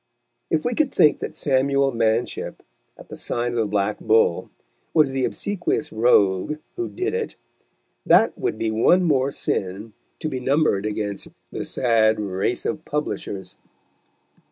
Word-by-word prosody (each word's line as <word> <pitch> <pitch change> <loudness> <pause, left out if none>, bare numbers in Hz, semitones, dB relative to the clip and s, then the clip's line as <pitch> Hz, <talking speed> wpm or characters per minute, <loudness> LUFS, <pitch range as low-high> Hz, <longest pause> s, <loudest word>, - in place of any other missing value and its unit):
If 155 - 0
we 245 - +1
could 290 0 +1
think 150 - +4
that - - -5
Samuel 140 0 +2
Manship, 115 0 -1 0.3
at - - -14
the - - -7
Sign 120 0 -2
of 120 - -2
the 110 - +1
Black 105 0 -1
Bull, 110 -6 +2 0.5
was 150 -4 +4
the 135 -1 0
obsequious 180 -6 -2
rogue 110 +1 +3 0.2
who 360 -1 -3
did 370 +2 -3
it, 465 -1 -3 0.7
that - - +4
would 385 - -2
be 110 - -1
one 145 +12 +4
more 140 -5 +2
sin 100 -4 -3 0.3
to 160 - -3
be 135 -4 -3
numbered 130 -6 +1
against 105 -2 -3 0.2
the - - -4
sad 110 -3 +2
race 100 +3 -2
of 155 0 -2
publishers. 105 -9 -4
125 Hz, 150 wpm, -23 LUFS, 105-155 Hz, 0.7 s, think